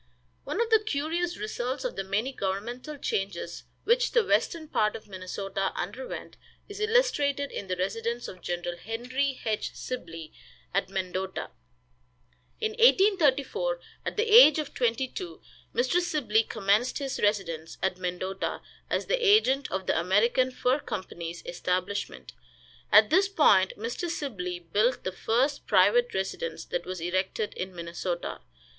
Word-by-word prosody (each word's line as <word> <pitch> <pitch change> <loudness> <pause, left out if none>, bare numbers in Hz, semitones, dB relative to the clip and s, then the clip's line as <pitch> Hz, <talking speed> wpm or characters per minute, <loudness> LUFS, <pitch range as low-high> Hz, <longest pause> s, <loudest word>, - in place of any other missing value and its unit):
One - - -3
of 465 -1 0
the 445 - +7
curious 340 0 -1
results 265 - -3
of 250 - -2
the 195 - -2
many 215 +8 -1
governmental 240 +9 -4
changes 195 -8 -3 0.2
which - - +2
the 475 -3 +4
western 330 -5 +1
part 215 -7 +1
of - - -9
Minnesota 195 0 -3
underwent 220 +9 -6 0.3
is 410 0 -8
illustrated 360 - +2
in 200 - -5
the 185 - -1
residence 225 +6 -2
of 185 - -10
Gen. 175 0 -3 0.2
Henry 255 +5 -2
H. 215 -2 -2
Sibley, 165 -10 -6 0.4
at 195 0 0
Mendota. 190 0 -3 1.1
In 440 -1 0
1834, 425 - +3 0.2
at - - -4
the 435 - +3
age 445 -9 +8
of 305 -2 -3
twenty 245 +1 +1
two, 175 -9 -7 0.3
Mr. 255 +8 +2
Sibley 255 -11 +2
commenced 215 +2 +1
his 275 -2 -3
residence 170 -6 -1
at 190 -1 0
Mendota, 185 +1 -3 0.3
as - - 0
the - - 0
agent 340 - +4
of 190 0 -3
the - - +2
American 220 +9 +3
Fur 255 +2 +1
Company's 175 - -6
establishment. 185 +3 -3 0.6
At 215 0 +7
this 380 +4 +5
point 190 - +4
Mr. 235 - -3
Sibley 195 - -3
built 205 +9 0
the 185 - -2
first 250 +9 0
private 215 +5 +4
residence 190 - -3
that - - -4
was 185 -2 -5
erected 185 +4 -1
in 185 0 -5
Minnesota. 170 +1 -4
225 Hz, 140 wpm, -28 LUFS, 190-295 Hz, 1.1 s, age